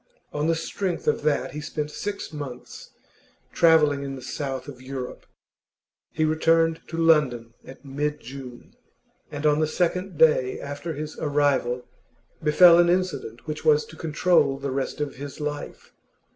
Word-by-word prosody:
On 150 Hz, +1 st, -1 dB
the 165 Hz, -, +2 dB
strength 175 Hz, +2 st, -3 dB
of 150 Hz, -, +2 dB
that 150 Hz, -1 st, 0 dB
he 150 Hz, -, -6 dB
spent 150 Hz, 0 st, -4 dB
six 200 Hz, -1 st, -5 dB
months 140 Hz, -5 st, -8 dB, 0.6 s
travelling 155 Hz, -4 st, +4 dB
in 135 Hz, -1 st, -5 dB
the 130 Hz, -, -9 dB
South 135 Hz, 0 st, -4 dB
of 130 Hz, -3 st, -10 dB
Europe. 130 Hz, -1 st, -7 dB, 0.8 s
He 155 Hz, -, 0 dB
returned 165 Hz, +1 st, +2 dB
to 165 Hz, -, -6 dB
London 145 Hz, -8 st, +2 dB
at 135 Hz, +2 st, -13 dB
mid 150 Hz, +2 st, -2 dB
June, 125 Hz, -1 st, -10 dB, 0.6 s
and 145 Hz, +1 st, -5 dB
on 150 Hz, 0 st, +4 dB
the 155 Hz, -, +2 dB
second 180 Hz, +2 st, -1 dB
day 140 Hz, -5 st, +4 dB
after 145 Hz, +4 st, -5 dB
his 150 Hz, +1 st, -6 dB
arrival 140 Hz, -4 st, +1 dB, 0.6 s
befell 170 Hz, +3 st, +7 dB
an 175 Hz, 0 st, +5 dB
incident 175 Hz, -10 st, -1 dB
which 155 Hz, -1 st, -5 dB
was 150 Hz, -1 st, +4 dB
to -, -, -13 dB
control 155 Hz, -3 st, +2 dB
the 140 Hz, 0 st, -4 dB
rest 135 Hz, +2 st, -3 dB
of 145 Hz, -3 st, -3 dB
his 140 Hz, +1 st, -8 dB
life. 150 Hz, -1 st, -6 dB
150 Hz, 155 wpm, -25 LUFS, 140-160 Hz, 0.8 s, befell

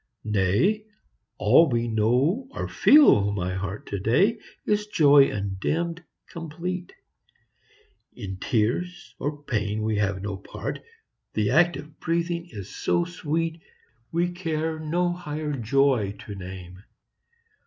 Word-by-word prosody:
Nay! 110 Hz, -, +1 dB, 0.5 s
all 130 Hz, +10 st, +5 dB
we 120 Hz, -1 st, 0 dB
know, 125 Hz, -, +1 dB
or -, -, -3 dB
feel, 105 Hz, -, +6 dB
my 95 Hz, -2 st, -2 dB
heart, 95 Hz, +2 st, -5 dB
To 100 Hz, -, -3 dB
day 190 Hz, -, +2 dB, 0.3 s
is 210 Hz, 0 st, 0 dB
joy 145 Hz, -7 st, +6 dB
undimmed, 155 Hz, -, -2 dB, 0.2 s
complete; 175 Hz, +3 st, -6 dB, 1.2 s
In 95 Hz, -5 st, -6 dB
tears 120 Hz, -, -1 dB
or 145 Hz, 0 st, -4 dB
pain 110 Hz, -4 st, -2 dB
we 110 Hz, -1 st, 0 dB
have 100 Hz, -2 st, -1 dB
no 100 Hz, -2 st, -3 dB
part; 95 Hz, -, -6 dB, 0.6 s
The 105 Hz, 0 st, +1 dB
act 165 Hz, +1 st, +4 dB
of 150 Hz, +1 st, -12 dB
breathing 170 Hz, +1 st, -1 dB
is 100 Hz, -4 st, -9 dB
so 175 Hz, -, +1 dB
sweet, 165 Hz, -1 st, -3 dB, 0.5 s
We 175 Hz, +1 st, 0 dB
care 160 Hz, -3 st, -2 dB
no 175 Hz, +3 st, 0 dB
higher 150 Hz, -3 st, -4 dB
joy 125 Hz, -4 st, +1 dB
to 105 Hz, -, -7 dB
name. 95 Hz, -1 st, -9 dB
140 Hz, 120 wpm, -25 LUFS, 105-170 Hz, 1.2 s, feel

